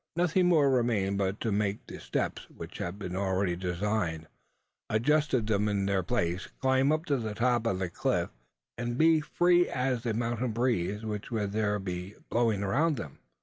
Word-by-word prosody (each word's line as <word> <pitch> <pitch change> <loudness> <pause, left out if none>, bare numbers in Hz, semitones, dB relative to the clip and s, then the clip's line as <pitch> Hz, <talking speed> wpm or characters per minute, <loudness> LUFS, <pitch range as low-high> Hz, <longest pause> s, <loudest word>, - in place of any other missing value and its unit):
Nothing 180 +1 +2
more 150 -6 +4
remained 110 -6 +1
but 95 +1 -1
to 115 - 0
make 100 0 -1
the - - -9
steps - - -3
which - - -9
had 85 +3 -4
been 90 -3 -5
already 95 -1 0
designed 90 -2 -2 0.6
adjust 135 +1 +2
them 105 -1 +1
in 100 -1 0
their 100 -1 +1
places 90 -3 -1
climb 130 +1 +3
up 155 +1 0
to 145 -5 +1
the 110 -3 -4
top 120 0 +1
of 95 - +1
the 95 -1 -1
cliff - - 0 0.5
and 120 0 -2
be 160 +1 +5
free 175 +3 +3
as 125 -2 -1
the 115 -2 -2
mountain 120 0 -1
breeze, 110 -3 0
which 105 -1 -4
would 105 -4 -2
there 105 -1 0
be 95 0 -5 0.2
blowing 115 -4 +2
around 145 +10 +1
them! 75 -4 -7
110 Hz, 180 wpm, -29 LUFS, 100-130 Hz, 0.6 s, be